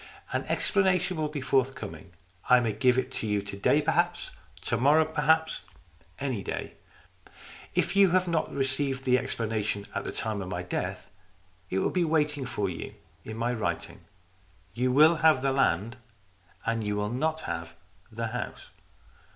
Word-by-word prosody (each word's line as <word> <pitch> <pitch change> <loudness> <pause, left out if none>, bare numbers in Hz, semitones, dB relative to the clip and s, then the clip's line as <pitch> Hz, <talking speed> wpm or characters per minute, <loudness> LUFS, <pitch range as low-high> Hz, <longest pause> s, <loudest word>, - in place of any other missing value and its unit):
"An - - -1
explanation 185 -2 +1
will 155 -1 0
be 150 -1 -5
forthcoming. 130 - -1 0.4
I 125 - +8
may 115 -3 0
give 125 +4 +3
it 130 0 0
to 115 - -4
you 105 -1 0
to 100 0 -7
day 140 +9 +3
perhaps 175 +3 0 0.3
to - - -1
morrow 145 +7 +4
perhaps 160 - +2 0.6
any 130 -7 -2
day. - - -5 1.0
If 180 - +1
you 200 -1 +6
have 185 +1 +2
not 165 -2 0
received 135 0 -1
the 125 -1 +4
explana 110 -3 -2
tion 100 -1 -2
at 100 - -2
the - - -4
time 110 -3 -2
of 90 - -6
my 90 -1 -3
death, 90 - -4 0.6
it 95 - -1
will 95 - +1
be 180 - +1
waiting 150 -4 +1
for 110 -5 -1
you 90 -3 -6 0.3
in 110 0 -7
my 120 +2 0
writing. 85 -8 -3 0.7
You 125 +3 +1
will 155 +5 +6
have 155 -5 +4
the 135 - +2
land, 115 -3 +1 0.7
and 115 -1 0
you 105 0 -1
will 105 0 -1
not 160 +5 -1
have 85 0 -5 0.4
the 115 +1 -3
house." 125 +2 -6
130 Hz, 165 wpm, -28 LUFS, 105-155 Hz, 1.0 s, I